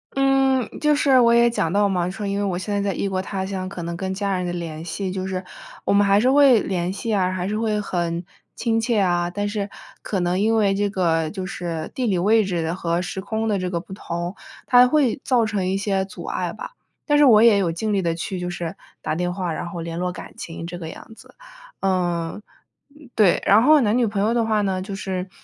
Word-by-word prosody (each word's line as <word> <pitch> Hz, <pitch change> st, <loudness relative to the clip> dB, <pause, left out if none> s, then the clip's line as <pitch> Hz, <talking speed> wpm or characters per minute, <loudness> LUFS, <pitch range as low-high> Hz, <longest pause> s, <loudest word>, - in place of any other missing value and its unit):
嗯， 270 Hz, -2 st, +3 dB
就 300 Hz, 0 st, +3 dB
是 275 Hz, -3 st, +4 dB
我 235 Hz, -1 st, +5 dB
也 235 Hz, 0 st, +5 dB
讲 165 Hz, -8 st, -1 dB
到 205 Hz, +1 st, +3 dB
嘛， 180 Hz, -2 st, 0 dB
说 205 Hz, +3 st, -5 dB
因 200 Hz, 0 st, -1 dB
为 205 Hz, -, -1 dB
我 185 Hz, -3 st, -1 dB
现 205 Hz, +3 st, -4 dB
在 200 Hz, -, 0 dB
在 200 Hz, -1 st, -1 dB
异 -, -, -1 dB
国 190 Hz, -1 st, -1 dB
他 190 Hz, 0 st, -4 dB
乡， 190 Hz, -1 st, -4 dB
可 180 Hz, -3 st, -7 dB
能 170 Hz, 0 st, -4 dB
跟 190 Hz, +2 st, -3 dB
家 195 Hz, 0 st, -1 dB
人 180 Hz, -, -2 dB
的 175 Hz, -, -2 dB
联 165 Hz, -2 st, -5 dB
系 185 Hz, +3 st, -4 dB
就 190 Hz, 0 st, -3 dB
是 185 Hz, -1 st, -3 dB, 0.4 s
我 -, -, +2 dB
们 205 Hz, 0 st, +4 dB
还 200 Hz, +1 st, +4 dB
是 255 Hz, +4 st, +3 dB
会 275 Hz, -4 st, +6 dB
联 180 Hz, -1 st, -2 dB
系 215 Hz, +3 st, -3 dB
啊， 185 Hz, -2 st, +1 dB
还 185 Hz, 0 st, -3 dB
是 210 Hz, -, -2 dB
会， 215 Hz, -1 st, 0 dB
很 175 Hz, -3 st, -2 dB, 0.3 s
亲 225 Hz, -1 st, 0 dB
切 225 Hz, -2 st, +1 dB
啊。 175 Hz, -2 st, +1 dB
但 205 Hz, +3 st, -3 dB
是 205 Hz, -1 st, -3 dB, 0.3 s
可 195 Hz, -, -2 dB
能 175 Hz, +1 st, 0 dB
因 225 Hz, +2 st, +2 dB
为 200 Hz, -3 st, +3 dB
这 205 Hz, +1 st, 0 dB
个 165 Hz, -5 st, 0 dB
就 190 Hz, 0 st, -5 dB
是 170 Hz, -4 st, -5 dB
地 255 Hz, -2 st, -1 dB
理 190 Hz, -4 st, +1 dB
位 215 Hz, +5 st, +3 dB
置 170 Hz, -3 st, -2 dB
和 170 Hz, -1 st, -1 dB
时 190 Hz, +1 st, -5 dB
空 220 Hz, +3 st, -2 dB
的 205 Hz, -3 st, +1 dB
这 180 Hz, 0 st, -2 dB
个 170 Hz, -2 st, -2 dB
不 185 Hz, +2 st, -10 dB
同， 175 Hz, -1 st, -5 dB, 0.3 s
它 250 Hz, 0 st, +6 dB
会 265 Hz, -3 st, +1 dB
造 245 Hz, -3 st, +2 dB
成 205 Hz, -4 st, -1 dB
一 190 Hz, -, 0 dB
些 195 Hz, -2 st, 0 dB
阻 195 Hz, -, -10 dB
碍 -, -, -3 dB
吧。 -, -, -8 dB, 0.3 s
但 295 Hz, -, +2 dB
是 295 Hz, -, +6 dB
我 220 Hz, -5 st, +7 dB
也 225 Hz, -3 st, +6 dB
有 180 Hz, -4 st, +1 dB
尽 210 Hz, +6 st, -2 dB
力 195 Hz, -, +1 dB
地 170 Hz, -2 st, 0 dB
去 180 Hz, +2 st, -4 dB
就 180 Hz, 0 st, -3 dB
是 170 Hz, -1 st, -5 dB, 0.3 s
打 -, -, -2 dB
电 180 Hz, +1 st, -1 dB
话， 180 Hz, -3 st, -3 dB
然 170 Hz, -, -4 dB
后 170 Hz, -, -6 dB
联 165 Hz, +1 st, -5 dB
络 180 Hz, 0 st, -1 dB
感 -, -, -10 dB
情 165 Hz, 0 st, -7 dB
这 175 Hz, +1 st, -6 dB
个 160 Hz, -, -6 dB
样 195 Hz, -, -11 dB
子。 -, -, -17 dB, 0.5 s
呃， 175 Hz, -1 st, -1 dB, 0.7 s
对， 205 Hz, -6 st, +4 dB
然 210 Hz, +3 st, +6 dB
后 300 Hz, +1 st, +6 dB
男 215 Hz, +1 st, +2 dB
女 240 Hz, -2 st, +2 dB
朋 205 Hz, -1 st, -2 dB
友 215 Hz, +3 st, +2 dB
的 235 Hz, -1 st, +1 dB
话 215 Hz, -1 st, +1 dB
呢， 190 Hz, -2 st, -1 dB
就 195 Hz, +1 st, -6 dB
是， 190 Hz, -1 st, -4 dB
195 Hz, 265 characters per minute, -22 LUFS, 175-220 Hz, 0.7 s, 我